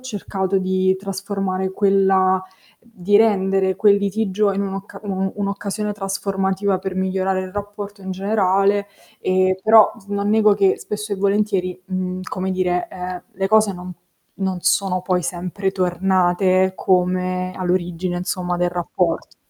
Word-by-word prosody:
cercato 195 -5 -2
di 185 0 +1
trasformare 195 -1 -3
quella 190 -1 +3 0.4
di 205 -4 0
rendere 195 -3 +2
quel 205 0 +5
litigio 200 0 0
in 200 +1 -1
un'occa 195 0 -6
un 200 - -3
un 190 0 -1
un'occasione 205 +1 -3
trasformativa 195 -1 -1
per 190 0 -5
migliorare 190 0 0
il 185 0 -8
rapporto 205 0 -6
in 190 - -6
generale, 200 +1 +1 0.3
e 185 0 +2
però 220 -1 +6 0.2
non 200 0 -1
nego 215 -1 +4
che 195 -1 +3
spesso 210 0 -5
e - - -1
volentieri, 195 -2 0
mhmm, 185 -1 -3
come 190 0 -3
dire, 180 -1 0
ehm, 180 -1 -6
le 195 0 -1
cose 215 -2 +4
non 180 0 -8 0.5
non 190 -1 -1
sono 185 +1 +1
poi 185 -1 0
sempre 185 +3 -3
tornate 185 0 +2
come 185 0 0
all'origine, 180 -1 -1
insomma, 180 -1 -2
del 175 0 0
rapporto. 175 -1 -2
190 Hz, 140 wpm, -20 LUFS, 185-200 Hz, 0.5 s, però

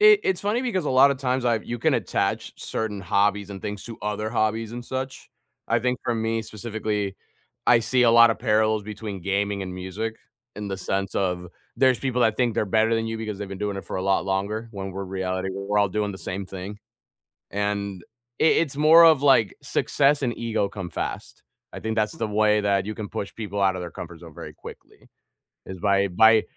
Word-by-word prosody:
It 425 0 +7
it's 185 - +1
funny 215 +5 0
because 190 -10 -1
a - - -1
lotta 135 +2 +6
times 130 -1 -1
I've 115 -3 +1
you 120 0 -4
can - - +2
attach - - -1
certain 105 -3 -3
hobbies 100 +2 +1
and 95 -2 -8
things 105 -1 -5
to 115 -1 -8
other 105 +1 -2
hobbies 110 -1 0
and 120 0 -6
such. 130 +1 -5 0.4
I 115 - +3
think 125 +1 0
for 120 - 0
me, 115 0 -1
specifically, 105 -2 -3 0.5
I 115 -1 +6
see 125 +2 +2
a 115 - +6
lotta 115 -1 +7
parallels 110 -2 +2
between 105 -2 -6
gaming 100 +1 -1
and 90 -1 -6
music, 105 +5 -4 0.4
in 105 0 -5
the 95 - -3
sense 95 +1 -2
of, 90 -2 -1 0.3
there's 130 -2 +4
people 125 -2 0
that 110 -2 +3
think 120 -3 +1
they're - - +1
better 110 +2 +2
than 115 0 0
you 115 0 -3
because 110 -2 -4
they've 100 -2 -5
been 100 - -7
doing 105 -1 -2
it 100 - -6
for - - -5
a 95 - -2
lot 95 0 +2
longer, 100 +4 -2
when 95 -1 -5
we're 100 +1 -4
reality, 95 0 -3
we're 100 +2 -1
all 100 -1 +3
doing 105 +1 -1
the 95 - -9
same 95 +1 -5
thing, 95 +2 -7 0.7
and 100 -2 -2 0.4
it 160 - +4
it's 145 -4 -1
more 160 +3 +8
of, 155 -4 +6
like, 130 -8 +4
success 145 +1 +2
and 120 -3 -1
ego 115 -4 0
come 95 -4 -6
fast. - - -5 0.3
I - - -7
think 110 0 -3
that's 105 -1 +1
the 110 - -3
way 105 0 +3
that 100 -1 +1
you 110 - -4
can 105 -2 -6
push 100 - -5
people 100 -2 -4
outta 95 -1 +2
their 85 - -6
comfort 85 -1 -9
zone 80 -3 -12
very - - -9
quickly, - - -13 0.6
is 95 -1 -8
by 100 +1 +2
by 110 +4 +6
105 Hz, 210 wpm, -24 LUFS, 100-115 Hz, 0.7 s, more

